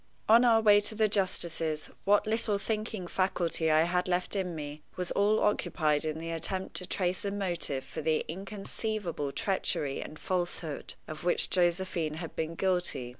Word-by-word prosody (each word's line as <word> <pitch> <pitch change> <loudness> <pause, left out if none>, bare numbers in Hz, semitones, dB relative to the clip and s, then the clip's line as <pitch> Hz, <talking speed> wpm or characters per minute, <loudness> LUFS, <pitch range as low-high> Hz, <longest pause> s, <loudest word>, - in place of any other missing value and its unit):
On 230 +3 +7
our 230 -2 +5
way 205 -1 +7
to 205 +1 -2
the 215 0 +3
justice's, 170 -6 0
what 205 +1 +4
little 220 -1 +1
thinking 215 -1 -3
faculty 175 -3 0
I 155 +1 +5
had 180 +2 0
left 180 +2 -1
in 180 -3 -2
me 150 0 -6
was 180 -1 -2
all 210 +2 +3
occupied 155 -7 +1
in 155 0 -2
the 165 +1 -5
attempt 185 +3 -3
to 180 - -4
trace 185 -1 -1
a 200 - -1
motive 175 -9 -2
for - - -6
the 155 0 +1
inconceivable 195 -3 -4
treachery 185 -8 0
and 155 - -8
falsehood 175 -4 -3
of 155 +1 -7
which 175 - +3
Josephine 175 -3 +1
had 165 0 -7
been 160 +1 -3
guilty. 180 -9 0
180 Hz, 170 wpm, -30 LUFS, 160-205 Hz, -, On